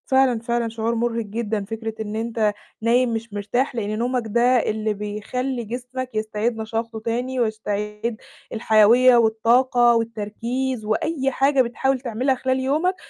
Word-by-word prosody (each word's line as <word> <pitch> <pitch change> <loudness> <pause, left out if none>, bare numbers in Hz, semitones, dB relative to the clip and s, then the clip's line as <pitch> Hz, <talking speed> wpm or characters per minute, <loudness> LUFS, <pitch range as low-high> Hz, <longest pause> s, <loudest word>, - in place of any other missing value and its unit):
فعلًا، 265 -3 +3
فعلًا 235 0 -1
شعور 225 +1 -2
مُرهِق 230 -1 -1
جدًا 210 -1 -3
فكرة 225 +1 -5
إن 215 0 -5
أنت 225 -2 0 0.3
نايم 235 +1 +2
مش 225 -1 -5
مرتاح، 240 +6 -1
لإن 215 -1 -2
نومك 245 +1 0
ده 235 +2 +1
اللي 220 -3 +2
بيخلّي 220 +5 -4
جسمك 250 +3 -5
يستعيد 215 +2 -1
نشاطه 225 +1 -4
تاني 245 +3 -2
ويستعيد 215 0 -2 0.4
الحيويّة 225 +3 +5
والطاقة 235 +2 +4
والتركيز 230 +2 -2
وأي 270 +5 0
حاجة 275 +1 +3
بتحاول 260 +2 0
تعملها 255 +2 0
خلال 260 +1 -1
يومك، 305 +8 +1
230 Hz, 135 wpm, -22 LUFS, 220-255 Hz, 0.4 s, الحيويّة